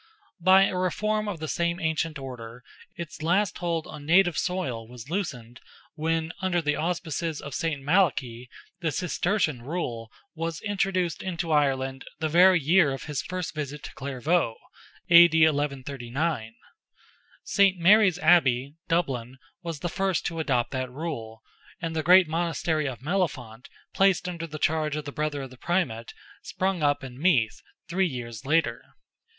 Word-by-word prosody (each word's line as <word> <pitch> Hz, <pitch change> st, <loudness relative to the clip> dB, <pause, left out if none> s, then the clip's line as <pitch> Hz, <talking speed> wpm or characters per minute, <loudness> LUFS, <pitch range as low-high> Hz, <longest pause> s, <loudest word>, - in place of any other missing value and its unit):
By 190 Hz, +2 st, +6 dB
a 195 Hz, -, 0 dB
reform 215 Hz, +4 st, 0 dB
of 190 Hz, -6 st, -4 dB
the 155 Hz, -, -4 dB
same 170 Hz, +3 st, -1 dB
ancient 160 Hz, -1 st, -1 dB
order, 125 Hz, -3 st, -9 dB, 0.3 s
its 170 Hz, -3 st, -8 dB
last 180 Hz, +4 st, +1 dB
hold 170 Hz, -2 st, -1 dB
on 150 Hz, -, -9 dB
native 175 Hz, +2 st, +4 dB
soil 135 Hz, -12 st, -2 dB
was 125 Hz, +4 st, -11 dB
loosened 125 Hz, -, -4 dB, 0.3 s
when, 160 Hz, +1 st, -1 dB
under 185 Hz, -2 st, +1 dB
the 150 Hz, -2 st, 0 dB
auspices 165 Hz, -2 st, -2 dB
of 140 Hz, -, -8 dB
St. 165 Hz, -4 st, -1 dB
Malachy, 135 Hz, -8 st, +1 dB, 0.3 s
the 165 Hz, -2 st, -1 dB
Cistercian 175 Hz, -, 0 dB
rule 120 Hz, -6 st, -4 dB, 0.2 s
was 165 Hz, -1 st, -4 dB
introduced 190 Hz, -4 st, -1 dB
into 175 Hz, -3 st, -3 dB
Ireland 135 Hz, -3 st, +1 dB
the 155 Hz, -, -1 dB
very 180 Hz, +3 st, +6 dB
year 160 Hz, 0 st, +4 dB
of 135 Hz, -, -6 dB
his 150 Hz, -3 st, -3 dB
first 185 Hz, -1 st, -5 dB
visit 150 Hz, -2 st, -5 dB
to -, -, -8 dB
Clairvaux 135 Hz, 0 st, 0 dB, 0.5 s
(A.D. 170 Hz, -1 st, +8 dB
1139). 140 Hz, -3 st, -2 dB, 0.9 s
St. 195 Hz, -2 st, +3 dB
Mary's 190 Hz, +1 st, +5 dB
Abbey, 140 Hz, -6 st, +3 dB
Dublin, 130 Hz, -7 st, -1 dB, 0.2 s
was 165 Hz, -4 st, -6 dB
the -, -, -1 dB
first 190 Hz, 0 st, -1 dB
to 165 Hz, -1 st, -3 dB
adopt 125 Hz, -6 st, 0 dB
that 130 Hz, -1 st, -3 dB
rule, 125 Hz, -6 st, -6 dB, 0.4 s
and 165 Hz, -1 st, -4 dB
the 160 Hz, -, +1 dB
great 180 Hz, +2 st, +6 dB
monastery 160 Hz, -1 st, -1 dB
of 130 Hz, -2 st, -6 dB
Mellifont, 135 Hz, -, -2 dB, 0.2 s
placed 190 Hz, -2 st, +3 dB
under 170 Hz, -2 st, -5 dB
the 155 Hz, -1 st, -7 dB
charge 155 Hz, -1 st, 0 dB
of 150 Hz, -1 st, -4 dB
the 145 Hz, -, -5 dB
brother 150 Hz, -2 st, -2 dB
of 135 Hz, -, -9 dB
the 130 Hz, -, -13 dB
Primate, 125 Hz, -10 st, -2 dB, 0.3 s
sprung 190 Hz, -2 st, -2 dB
up 145 Hz, -1 st, +1 dB
in 130 Hz, 0 st, -9 dB
Meath, 130 Hz, -, +2 dB, 0.3 s
three 185 Hz, +2 st, +1 dB
years 120 Hz, -6 st, -6 dB
later. 165 Hz, +2 st, +1 dB
160 Hz, 155 wpm, -26 LUFS, 135-175 Hz, 0.9 s, A.D